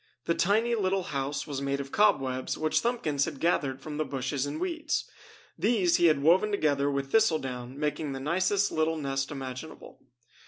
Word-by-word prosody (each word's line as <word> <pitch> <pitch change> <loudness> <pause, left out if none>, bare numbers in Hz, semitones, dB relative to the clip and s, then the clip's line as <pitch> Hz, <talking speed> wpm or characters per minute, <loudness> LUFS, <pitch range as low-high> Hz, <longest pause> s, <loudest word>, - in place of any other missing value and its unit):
The 170 - +2
tiny, 220 +7 +2
little 195 -3 0
house 140 +1 -2
was 140 -3 -4
made 140 0 -1
of 140 0 -6
cobwebs 135 -12 +1
which 155 0 +1
Thumbkins 160 - 0
had 150 -4 -6
gathered 140 -6 0
from 150 -1 -6
the 155 - +1
bushes 135 0 -2
and 145 - -4
weeds. 330 -4 -2 0.5
These 195 -8 +3
he 175 - +5
had 150 -3 +2
woven 180 +7 +5
together 145 -8 +1
with 140 -1 -2
thistle 220 -8 +4
down, 125 -1 -6
making 150 0 -2
the 135 - -5
nicest 185 +7 +1
little 160 +1 0
nest 135 -2 -2
imaginable. 135 +2 -8
150 Hz, 175 wpm, -28 LUFS, 135-185 Hz, 0.5 s, he